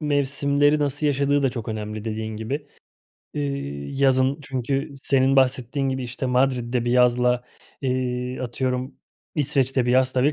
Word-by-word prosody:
mevsimleri 145 Hz, 0 st, +2 dB
nasıl 145 Hz, +1 st, 0 dB
yaşadığı 140 Hz, 0 st, +2 dB
da 135 Hz, -, +2 dB
çok 115 Hz, -2 st, -6 dB
önemli 105 Hz, -1 st, -4 dB
dediğin 110 Hz, -1 st, -4 dB
gibi. 135 Hz, +7 st, -4 dB, 0.7 s
İii, 140 Hz, -, -4 dB
yazın 130 Hz, 0 st, +3 dB
çünkü 135 Hz, +3 st, -2 dB
senin 135 Hz, 0 st, +3 dB
bahsettiğin 130 Hz, +1 st, +2 dB
gibi, 130 Hz, 0 st, -2 dB
işte, 125 Hz, +2 st, -4 dB
Madrid'de 125 Hz, -2 st, +1 dB
bir 120 Hz, -, 0 dB
yazla, 125 Hz, 0 st, +3 dB, 0.4 s
eee, 125 Hz, -1 st, -2 dB
atıyorum 125 Hz, +1 st, -2 dB, 0.4 s
İsveç'te 135 Hz, -4 st, +1 dB
bir -, -, +2 dB
yaz 130 Hz, 0 st, +3 dB
tabii 135 Hz, +4 st, +2 dB
130 Hz, 140 wpm, -23 LUFS, 125-140 Hz, 0.7 s, yazın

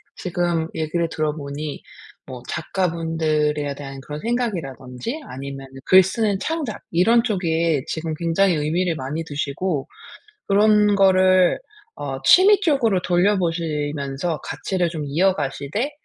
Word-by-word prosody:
지금 175 Hz, -2 st, -1 dB
얘기를 160 Hz, +1 st, -1 dB
들어보니 150 Hz, -1 st, -4 dB, 0.5 s
뭐 130 Hz, -2 st, -8 dB
작가분들에 160 Hz, -4 st, -1 dB
대한 135 Hz, -1 st, -8 dB
그런 150 Hz, 0 st, -6 dB
생각이라든지 195 Hz, -, -3 dB
아니면은 135 Hz, 0 st, -8 dB
글 190 Hz, 0 st, +7 dB
쓰는 205 Hz, +1 st, 0 dB
창작 305 Hz, -4 st, -3 dB
이런 230 Hz, +8 st, +4 dB
쪽에 165 Hz, -, 0 dB
지금 160 Hz, 0 st, -3 dB
굉장히 170 Hz, +4 st, +2 dB
의미를 165 Hz, +3 st, 0 dB
많이 145 Hz, +4 st, -4 dB
두시고 145 Hz, +1 st, -3 dB, 0.6 s
그런 210 Hz, 0 st, +4 dB
거를 185 Hz, -2 st, +4 dB, 0.4 s
어 -, -, -5 dB
취미 400 Hz, +3 st, +7 dB
쪽으로 240 Hz, -, +2 dB
돌려보시면서 165 Hz, -5 st, 0 dB
가치를 180 Hz, -3 st, -2 dB
좀 160 Hz, -3 st, -5 dB
이어가시되 160 Hz, -, -1 dB
165 Hz, 285 characters per minute, -22 LUFS, 150-195 Hz, 0.6 s, 글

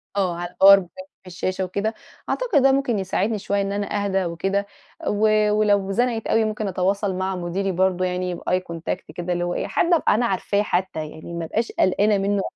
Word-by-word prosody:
آه، 185 Hz, -4 st, 0 dB
على 175 Hz, 0 st, -5 dB
الpower 195 Hz, +2 st, +7 dB
point 275 Hz, +10 st, -11 dB, 0.2 s
في -, -, -17 dB
الشاشة 185 Hz, +1 st, -3 dB
وكده، 200 Hz, +4 st, -2 dB, 0.4 s
أعتقد 460 Hz, -, +1 dB
ده 270 Hz, 0 st, +5 dB
ممكن 265 Hz, -6 st, +1 dB
يساعدني 200 Hz, +3 st, -1 dB
شويّة 200 Hz, 0 st, -1 dB
إن 195 Hz, 0 st, -2 dB
أنا 205 Hz, 0 st, -2 dB
أهدى 195 Hz, -1 st, 0 dB
وكده. 195 Hz, +4 st, -1 dB, 0.4 s
و 215 Hz, 0 st, +3 dB
ولو 205 Hz, -2 st, +2 dB
زنقت 235 Hz, +1 st, 0 dB
أوي 225 Hz, 0 st, +2 dB
ممكن 215 Hz, -1 st, -2 dB
أتواصل 195 Hz, +1 st, 0 dB
مع 185 Hz, +1 st, -2 dB
مديري 185 Hz, +2 st, -2 dB
برضو 185 Hz, 0 st, +1 dB
بeye 180 Hz, 0 st, -1 dB
contact 170 Hz, +2 st, -4 dB
كده 175 Hz, 0 st, -2 dB
اللي 175 Hz, 0 st, -1 dB
هو 175 Hz, 0 st, -1 dB
إيه، -, -, -2 dB
حد 345 Hz, -, +1 dB
ابقى 325 Hz, -, +3 dB
أنا 240 Hz, +3 st, +1 dB
عارفاه 200 Hz, -1 st, 0 dB
حتّى، 175 Hz, -6 st, -2 dB
يعني 160 Hz, +2 st, -10 dB
ما 170 Hz, -1 st, -3 dB
ابقاش 225 Hz, +8 st, -2 dB
قلقانة 205 Hz, +3 st, +2 dB
منّه 200 Hz, 0 st, 0 dB
195 Hz, 195 wpm, -23 LUFS, 180-210 Hz, 0.4 s, الpower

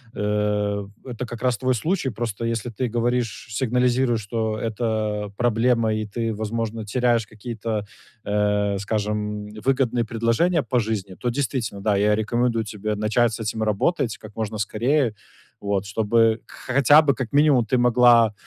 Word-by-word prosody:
э, 105 Hz, -1 st, 0 dB, 0.2 s
это 125 Hz, -1 st, -5 dB
как 120 Hz, -1 st, -8 dB
раз 125 Hz, -3 st, +2 dB
твой 130 Hz, +2 st, +1 dB
случай. 155 Hz, -, -1 dB
Просто 115 Hz, 0 st, -4 dB
если 115 Hz, +1 st, -2 dB
ты 125 Hz, +4 st, -2 dB
говоришь, 120 Hz, -1 st, -1 dB
сигнализируешь, 125 Hz, 0 st, +1 dB
что 110 Hz, +1 st, -2 dB
это 110 Hz, -2 st, -2 dB
проблема 115 Hz, -1 st, +2 dB
и 110 Hz, 0 st, -2 dB
ты, 115 Hz, +1 st, -3 dB
возможно, 110 Hz, +1 st, -3 dB
теряешь 120 Hz, 0 st, +1 dB
какие-то, 110 Hz, -1 st, -4 dB, 0.4 s
э, 105 Hz, -1 st, +1 dB
скажем, 105 Hz, 0 st, -2 dB, 0.2 s
выгодные 130 Hz, -3 st, +1 dB
предложения 115 Hz, +9 st, +1 dB
по 125 Hz, -, 0 dB
жизни, 105 Hz, -4 st, -3 dB
то 120 Hz, -, -2 dB
действительно, 120 Hz, -6 st, -2 dB
да, 105 Hz, -1 st, +2 dB
я 105 Hz, +1 st, +3 dB
рекомендую 115 Hz, +1 st, 0 dB
тебе 105 Hz, 0 st, -3 dB
начать 110 Hz, +2 st, +1 dB
с -, -, -5 dB
этим 110 Hz, 0 st, -2 dB
работать 110 Hz, -, 0 dB
как 105 Hz, 0 st, -13 dB
можно 110 Hz, -1 st, -3 dB
скорее, 120 Hz, +5 st, +1 dB, 0.5 s
вот, 100 Hz, -1 st, -1 dB
чтобы 110 Hz, +2 st, +2 dB
к -, -, -18 dB, 0.2 s
хотя 140 Hz, +3 st, +7 dB
бы, 145 Hz, -3 st, +2 dB
как 125 Hz, -4 st, -4 dB
минимум, 145 Hz, -5 st, +4 dB
ты 130 Hz, -, +1 dB
могла 120 Hz, -2 st, +5 dB
115 Hz, 155 wpm, -23 LUFS, 105-120 Hz, 0.5 s, хотя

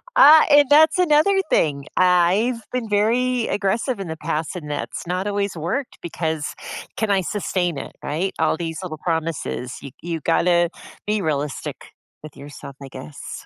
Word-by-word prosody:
Uh, 315 Hz, -11 st, +9 dB
and 290 Hz, -1 st, +6 dB
that's 310 Hz, +4 st, +6 dB
another 360 Hz, +3 st, +4 dB
thing. 140 Hz, -2 st, +1 dB
I 185 Hz, +6 st, +3 dB
I've 230 Hz, -, -10 dB
been 245 Hz, -3 st, -3 dB
very 235 Hz, +4 st, +1 dB
aggressive 210 Hz, +4 st, -1 dB
in 195 Hz, -, -5 dB
the 160 Hz, 0 st, -5 dB
past, 155 Hz, +1 st, -3 dB
and 155 Hz, -5 st, -7 dB
that's 145 Hz, +4 st, -5 dB
not 180 Hz, +3 st, -2 dB
always 200 Hz, -1 st, -1 dB
worked 180 Hz, -, -4 dB
because 160 Hz, -3 st, -3 dB, 0.4 s
can 220 Hz, -2 st, 0 dB
I 195 Hz, -1 st, +3 dB
sustain 180 Hz, -3 st, -2 dB
it, -, -, -7 dB
right? 175 Hz, +6 st, -2 dB
All 160 Hz, 0 st, +2 dB
these 165 Hz, 0 st, -4 dB
little 165 Hz, -4 st, -6 dB
promises, 160 Hz, -6 st, -3 dB
you 140 Hz, -, -9 dB
you 170 Hz, -1 st, -3 dB
gotta 175 Hz, +1 st, +2 dB, 0.4 s
be 210 Hz, -1 st, 0 dB
realistic 150 Hz, -3 st, -3 dB, 0.5 s
with 155 Hz, -, -10 dB
yourself, 140 Hz, 0 st, -10 dB
I 135 Hz, -, -8 dB
guess. 130 Hz, +3 st, -9 dB
180 Hz, 165 wpm, -22 LUFS, 155-220 Hz, 0.5 s, Uh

